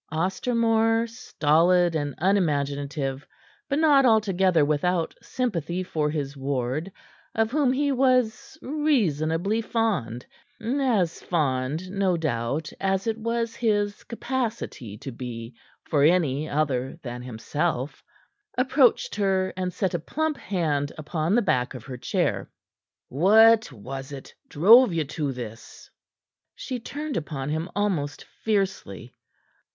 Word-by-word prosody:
Ostermore, 225 +6 +1
stolid 175 -6 +2
and 145 -3 -2
unimaginative, 145 -6 0 0.4
but 280 - +1
not 295 -3 +5
altogether 190 - +3
without 165 +3 0
sympathy 185 - -2
for 155 -4 -1
his 145 -2 -3
ward, 135 +5 -2 0.4
of 225 0 +1
whom 285 -2 +2
he 285 +2 +1
was 255 -1 +1
reasonably 210 - +1
fond 185 - -1 0.3
as 230 -7 0
fond, 150 +2 -1
no 195 -3 +1
doubt, 145 0 -2
as 195 0 0
it 225 -1 0
was 230 0 -2
his 205 -3 0
capacity 230 - -4
to 135 - -7
be 115 -1 -7 0.3
for 145 - 0
any 155 -2 +2
other 140 -2 -1
than 125 -1 -6
himself 130 +4 -3 0.5
approached 255 0 +3
her 190 -2 0
and 185 -1 -2
set 185 +1 -1
a 175 - 0
plump 315 - -2
hand 155 - -1
upon 155 +4 -1
the 240 - +3
back 125 -8 0
of 120 - -9
her 130 -2 -7
chair. - - -1 0.6
"What 220 - +5
was 135 +4 -8
it 140 -2 -9 0.2
drove 215 - +6
you 165 -1 +1
to 145 -1 -3
this?" 115 -3 -9 0.6
She 255 -2 -5
turned 295 +5 -5
upon 145 -3 -4
him 160 +3 -2
almost 180 -9 -1
fiercely. 190 - -3
175 Hz, 120 wpm, -25 LUFS, 145-225 Hz, 0.6 s, drove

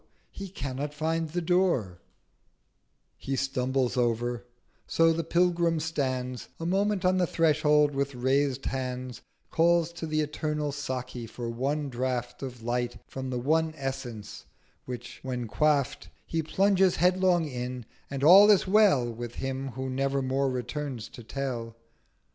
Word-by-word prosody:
he 195 -1 -7
cannot 145 -2 -4
find 160 +1 -1
the 175 +2 -2
Door 165 - +1 1.2
He 135 - -3
stumbles 130 -1 0
over—So 120 +6 0
the 165 +1 -2
Pilgrim 170 0 +2
stands 130 -5 -2
A 165 - -4
moment 195 +2 +1
on 185 0 +3
the 180 - +2
Threshold—with 150 -4 +2
raised 130 +2 +1
Hands 125 -2 -4 0.3
Calls 170 0 +3
to 170 -1 -5
the 155 0 +1
eternal 150 0 -2
Saki 130 -4 -5
for 115 +1 -5
one 140 +5 -1
Draught 125 -1 -3
Of 125 -4 -7
Light 120 0 -1
from 130 -1 -6
the 125 - -2
One 160 +5 +1
Essence: 130 -6 -6 0.4
which 125 -1 -7
when 125 -2 -3
quaff'd, 140 +6 +1 0.2
He 165 - -1
plunges 190 +3 +3
headlong 180 0 +3
in: 125 -3 -5 0.2
and 140 0 -4
all 195 +7 +9
is 205 -3 +5
well 195 - +5
With 120 0 -6
him 135 0 -3
who 130 +2 -4
never 135 +1 0
more 135 +1 +1
returns 125 -1 -4
to 120 - -11
tell. 115 -1 -4
135 Hz, 135 wpm, -28 LUFS, 125-165 Hz, 1.2 s, all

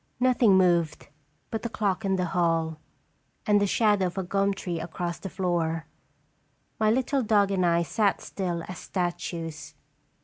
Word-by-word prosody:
Nothing 245 -5 +4
moved 170 -6 +2 0.4
but 225 - -2
the 235 - -3
clock 205 -2 -1
in 195 -1 +1
the 180 -1 0
hall, 165 -3 +1 0.7
and 205 -1 +4
the 205 - +2
shadow 205 -2 +3
of 175 - -8
a 190 - 0
gum 195 +2 +1
tree 180 -4 -4
across 170 +1 -4
the 195 - -6
floor. 170 -3 -1 0.9
My 215 -1 +3
little 260 +4 +1
dog 205 -3 +3
and 190 -2 +1
I 170 -1 +3
sat 205 +4 +1
still 175 -4 -4
as 185 - -7
statues. 170 -4 -4
185 Hz, 160 wpm, -27 LUFS, 170-205 Hz, 0.9 s, Nothing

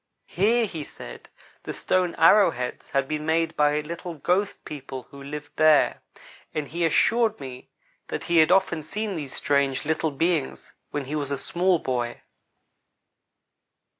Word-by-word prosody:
Here, 225 +5 +2
he 165 -7 -5
said, - - -11 0.3
the - - -6
stone 180 -2 0
arrow 200 +6 +6
heads 125 0 -5
had 135 -1 0
been 150 +1 -3
made 165 +1 +1
by 150 0 +2
little 170 +2 -6
ghost 180 +7 -1
people 135 -3 -7
who 140 - -11
lived 150 +2 -7
there, 155 -1 +4 0.5
and 150 -2 -2
he 170 +4 -3
assured 220 +7 +2
me 130 -2 -9 0.4
that - - -4
he 170 -1 +1
had 160 +1 +6
often 185 -4 +3
seen 200 +5 -4
these 145 -5 -6
strange 140 -1 +1
little 160 +1 0
beings 155 0 -1 0.2
when 145 -2 -3
he 145 +4 -4
was 145 -2 -2
a 140 - -1
small 180 +4 +1
boy. 120 -5 -3
155 Hz, 155 wpm, -25 LUFS, 140-175 Hz, 0.5 s, arrow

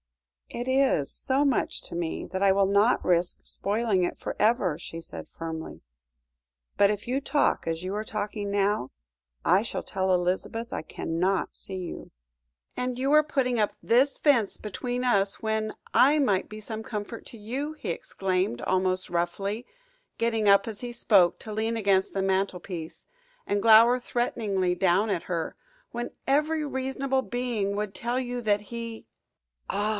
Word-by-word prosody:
"It 240 +1 -5
is 260 - +2
so 275 +2 +1
much 270 -4 0
to - - -7
me 170 -1 -3
that 190 +1 -3
I 195 - +6
will 195 0 +4
not 200 +5 +3
risk 175 0 +1
spoiling 205 -2 0
it 175 - -2
for - - -5
ever," 210 -8 +2
she 165 0 -7
said 165 - -9
firmly; 160 -1 -6 0.9
"but 200 - +5
if 210 +1 -4
you 260 +3 0
talk 290 - +1
as 165 +1 -2
you 190 +2 -3
are 210 - -2
talking 210 -1 -4
now, 200 -8 +1 0.6
I 185 +3 +5
shall 225 - -3
tell 190 -1 0
Elizabeth 185 +6 -1
I - - -2
cannot 175 +4 -1
see 190 - -5
you." 180 -2 -7 0.6
"And 250 0 -2
you 270 +3 +2
are 305 0 +7
putting 260 -5 0
up 210 - +1
this 260 +4 +3
fence 245 -9 +2
between 245 +4 -3
us, 200 -5 +2
when 220 0 -1 0.2
I 285 +4 +6
might 205 -9 +1
be 215 - -8
some 220 +1 -6
comfort 220 +1 -6
to 235 - -10
you," 260 +8 -4
he 305 - -4
exclaimed, 185 -9 -1
almost 185 0 0
roughly, 195 +6 -2 0.5
getting 225 -3 +1
up 200 +1 +5
as 220 -2 -5
he 245 -1 -4
spoke 200 -7 +3
to 215 - -7
lean 225 +2 -1
against 195 -3 +2
the 195 - 0
mantelpiece, 190 -3 -2 0.4
and 205 0 +1
glower 230 +3 +7
threateningly 205 -7 -1
down 190 +4 +2
at 180 -4 -1
her, 165 -2 -2 0.4
"when 240 0 -4 0.2
every 305 +3 +2
reasonable 265 0 -1
being 240 -6 -2
would 210 -1 -3
tell 240 +2 -1
you 245 -1 -3
that 210 -2 +2
he 230 +1 -7 0.3
" - - -47
"Ah! 205 +2 0
210 Hz, 165 wpm, -27 LUFS, 190-240 Hz, 0.9 s, are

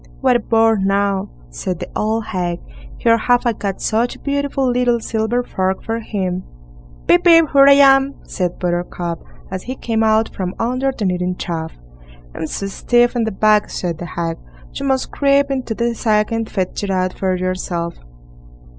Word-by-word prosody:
"What 260 -2 +3
a - - +4
bore 225 0 +3
now", 195 0 0 0.2
said 175 - -4
the - - -7
old 220 +1 -1
hag; 175 -4 -2 0.4
"here 230 0 +3
have 245 +2 +2
I 235 - +2
got 200 -2 -4
such 230 +3 0
a - - -15
beautiful 280 -1 -1
little 245 -1 +2
silver 225 +2 -1
fork 190 -4 -2
for 225 +1 -2
him." 190 -5 -3 0.6
"Pip, 350 - +4
pip! 330 -1 +7
here 275 0 +7
I 280 - +9
am", 275 0 +5
said 180 -2 -3
Buttercup, 175 -1 -3 0.3
as 190 -1 -4
he 255 +6 -6
came 225 -3 -1
out 220 0 +2
from 185 -1 -3
under 255 +3 0
the 225 -5 -4
kneading 180 0 -1
trough. 160 -3 -4 0.6
"I'm 160 - -4
so 195 - -4
stiff 240 +5 +2
in 235 -2 +1
the 220 - -2
back", 210 +1 +3
said 170 -3 -3
the 175 - -5
hag, 165 -1 -4 0.3
"you 275 - -4
must 265 -1 0
creep 280 0 +2
into 255 -4 -2
the 235 +1 0
sack 215 -2 +1
and 225 -1 -2
fetch 190 +1 -3
it 200 - -2
out 185 -1 0
for 190 -1 -1
yourself." 180 -2 -3
220 Hz, 180 wpm, -18 LUFS, 185-245 Hz, 0.6 s, I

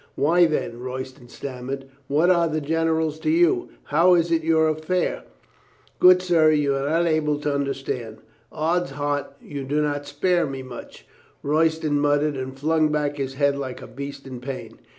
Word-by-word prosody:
"Why, 170 +4 +4
then?" 120 -6 -2
Royston 130 0 -7
stammered. 135 +1 -6 0.2
"What 155 +6 +3
are 170 -2 +3
the 155 -1 -1
generals 160 0 0
to 155 -1 -1
you? 165 -6 +3
How 170 +4 +4
is 170 -1 +1
it 165 -1 +2
your 160 0 +3
affair?" 155 +4 -1 0.7
"Good 180 0 +7
sir, 165 -3 +4
you 150 -2 +2
are 135 +1 -1
not 165 +2 +2
able 155 -2 +1
to 150 -1 -1
understand." 135 -5 -3 0.3
"Ods 170 +1 0
heart, 145 0 -2
you 140 -2 -7
do 145 +3 -1
not 145 -1 -1
spare 175 +2 +1
me 135 -1 -6
much," 130 -1 -11 0.4
Royston 155 0 +1
muttered 145 0 +2
and 130 0 -6
flung 155 +2 +2
back 150 -1 -1
his 135 -1 -4
head 140 0 +2
like 135 -2 -5
a - - -9
beast 140 +2 -8
in 130 -2 -7
pain. 130 +1 -7
150 Hz, 170 wpm, -23 LUFS, 135-160 Hz, 0.7 s, Good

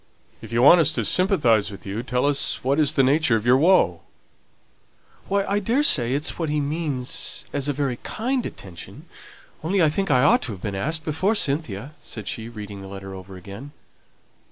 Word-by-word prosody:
"If - - -10
you 120 +1 +2
want 170 +6 +8
us 155 - +3
to - - -1
sympathize 145 - +2
with 100 - -10
you, 100 +3 -4
tell 125 +1 -1
us 145 -1 +1
what 140 +4 +1
is 150 -1 +3
the 135 - +3
nature 145 -1 +3
of 110 0 -2
your 125 +1 +5
woe." 140 - +3 1.3
"Why, 200 0 0
I 200 +1 0
daresay 195 - +2
it's 150 +5 -2
what 165 -2 -1
he 150 0 0
means 145 -3 -2
as 145 -1 -1
a - - +1
very 135 -3 -2
kind 250 - -2
attention, 90 - -9 0.6
only 190 +5 0
I 160 -3 +5
think 195 +4 -2
I 130 -2 +4
ought 145 - +4
to 115 - -2
have 95 - -11
been 105 - -3
asked 155 +11 -2
before 185 +8 0
Cynthia," 140 - -2
said 110 -4 -7
she, 115 0 -5
reading 105 -3 -8
the 95 - -9
letter 95 0 -8
over 95 0 -10
again. 100 +10 -10
140 Hz, 195 wpm, -23 LUFS, 110-160 Hz, 1.3 s, want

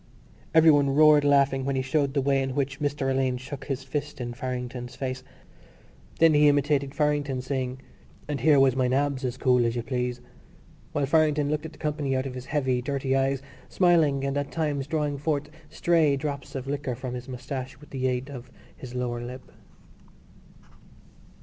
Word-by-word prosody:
Everyone 150 -3 +6
roared 150 -1 +6
laughing 140 -2 +3
when 135 0 -1
he 130 - 0
showed 140 +1 0
the 140 - +2
way 135 0 +2
in 135 -1 -3
which 140 -1 -1
Mr 145 -2 -1
Alleyne 130 -1 +1
shook 135 +2 -8
his 135 -2 -3
fist 145 +2 -4
in 120 -1 -4
Farrington's 125 -1 -5
face. 130 -1 -4 0.9
Then 165 -1 +5
he 150 0 +5
imitated 140 -1 +1
Farrington, 145 -3 0
saying, 130 -1 -3 0.4
"And 145 -2 -2
here 150 -3 +5
was 135 -2 +4
my 130 -1 +2
nabs, 135 +1 0
as 125 -1 -2
cool 125 -2 +3
as 115 0 0
you 120 - -2
please," 125 -1 -2 0.7
while 145 - 0
Farrington 150 -1 +2
looked 150 +1 -2
at - - -12
the - - -16
company 150 -3 -1
out 130 +1 -1
of 135 - -5
his 125 0 -8
heavy 130 -4 0
dirty 135 0 -1
eyes, 135 0 0 0.3
smiling 160 -7 +3
and 135 0 -1
at 140 - -4
times 145 -4 -1
drawing 150 -2 -1
forth 145 -1 -2 0.2
stray 160 -4 +2
drops 140 -1 -5
of 130 -1 -4
liquor 140 -2 -3
from 125 0 -6
his 125 +1 -7
moustache 130 +1 -6
with 150 - -16
the 130 -1 -1
aid 125 +1 -1
of 125 -2 -9 0.3
his 125 -1 -9
lower 120 -1 -2
lip. 125 +2 -9
135 Hz, 180 wpm, -26 LUFS, 130-145 Hz, 0.9 s, Everyone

